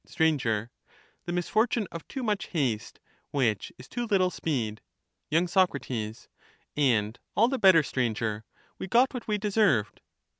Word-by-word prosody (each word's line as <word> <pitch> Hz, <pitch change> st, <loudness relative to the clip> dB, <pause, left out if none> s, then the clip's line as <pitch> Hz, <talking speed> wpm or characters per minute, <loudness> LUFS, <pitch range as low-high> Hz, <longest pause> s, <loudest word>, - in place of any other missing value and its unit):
Str, 160 Hz, -, -2 dB
The 120 Hz, -9 st, +1 dB, 0.7 s
misfortune 215 Hz, +5 st, +1 dB
of 170 Hz, -, -8 dB
too 265 Hz, -, -5 dB
much 210 Hz, -3 st, -1 dB
haste, 130 Hz, -, -2 dB, 0.3 s
which 115 Hz, -8 st, 0 dB
is -, -, -12 dB
too 240 Hz, 0 st, -4 dB
little 185 Hz, -4 st, +2 dB
speed. 115 Hz, -11 st, -2 dB, 0.2 s
" -, -, -54 dB
~ -, -, -53 dB
y. 165 Hz, +3 st, +3 dB
Soc. 180 Hz, -3 st, +2 dB, 1.0 s
And 115 Hz, -6 st, +1 dB, 0.2 s
all 230 Hz, -, +5 dB
the 265 Hz, 0 st, -1 dB
better, 185 Hz, -5 st, +6 dB
Stranger; 110 Hz, -5 st, -2 dB, 0.4 s
we -, -, -4 dB
got 245 Hz, +7 st, +3 dB
what 250 Hz, -3 st, -6 dB
we 210 Hz, -1 st, +1 dB
deserved. 200 Hz, -, +1 dB
165 Hz, 150 wpm, -28 LUFS, -, 1.0 s, better